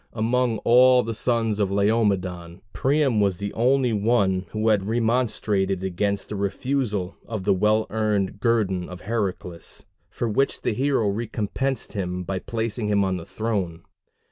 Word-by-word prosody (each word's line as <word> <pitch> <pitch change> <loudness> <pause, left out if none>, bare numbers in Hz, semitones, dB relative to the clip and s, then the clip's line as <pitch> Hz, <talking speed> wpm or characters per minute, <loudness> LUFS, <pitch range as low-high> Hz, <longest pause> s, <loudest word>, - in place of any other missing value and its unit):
Among 120 +1 +1
all 125 +1 +6
the 115 - -3
sons 115 -2 0
of 100 -2 +1
Laomedon, 95 -4 0
Priam 135 -4 +2
was 100 -3 +1
the 100 +1 -4
only 125 +1 +2
one 100 -4 +1
who 110 +1 0
had 100 -3 +2
remonstrated 110 -5 0
against 100 +2 -1
the 105 - -4
refusal 100 -1 -2
of 110 -4 -4
the 100 +1 +3
well 105 +3 +2
earned 105 -3 0
guerdon 100 -6 0
of 90 -1 -9
Heracles; 95 -6 -4 0.3
for 120 - -3
which 135 +6 0
the - - 0
hero 130 -2 +1
recompensed 115 +5 -2
him 90 -3 -3
by 95 +1 -3
placing 115 0 -3
him 100 -1 +2
on 95 -1 0
the 85 - -9
throne. 95 -7 -3
105 Hz, 150 wpm, -24 LUFS, 95-115 Hz, 0.3 s, all